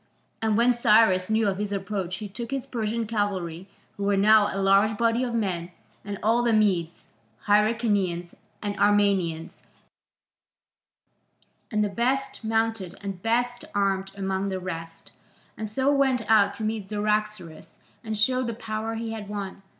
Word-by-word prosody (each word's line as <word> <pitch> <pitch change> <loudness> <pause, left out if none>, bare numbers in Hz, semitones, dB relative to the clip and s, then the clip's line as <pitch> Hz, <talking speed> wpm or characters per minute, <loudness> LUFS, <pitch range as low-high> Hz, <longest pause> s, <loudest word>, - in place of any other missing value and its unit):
And 220 -2 +1
when 240 +2 +4
Cyrus 210 -5 +4
knew 220 0 +2
of 195 -1 -1
his 205 -1 -2
approach 195 -2 -3
he 210 +3 -6
took 220 +4 -7
his 270 -1 -3
Persian 230 -3 -2
cavalry, 195 -5 -2 0.3
who 200 - -4
were 200 0 +2
now 210 +1 +6
a - - -4
large 195 +2 +3
body 230 +2 +2
of 240 -2 -2
men, 180 -6 -2 0.3
and 200 0 -5
all 230 +3 +3
the 235 -1 +2
Medes, 185 -6 0 0.4
Hyrcanians, 205 -5 +1 0.3
and 205 -1 -2
Armenians, 195 -6 +1 2.1
and 210 -1 +1
the - - +1
best 265 +6 -1
mounted 225 -4 -1
and 195 -3 -5
best 240 +2 0
armed 195 -1 0
among 195 0 -2
the 190 -1 -3
rest, 165 -2 -7 0.4
and 215 -1 -5
so 265 +6 +1
went 265 -4 +2
out 215 -2 +4
to 220 - -6
meet 215 -2 -2
Cyaxares 210 -6 -2 0.3
and 220 -1 -4
show 255 +4 +2
the 235 -3 -3
power 225 0 -4
he 225 0 -4
had 215 -2 -6
won. 200 -2 -5
210 Hz, 155 wpm, -26 LUFS, 195-225 Hz, 2.1 s, now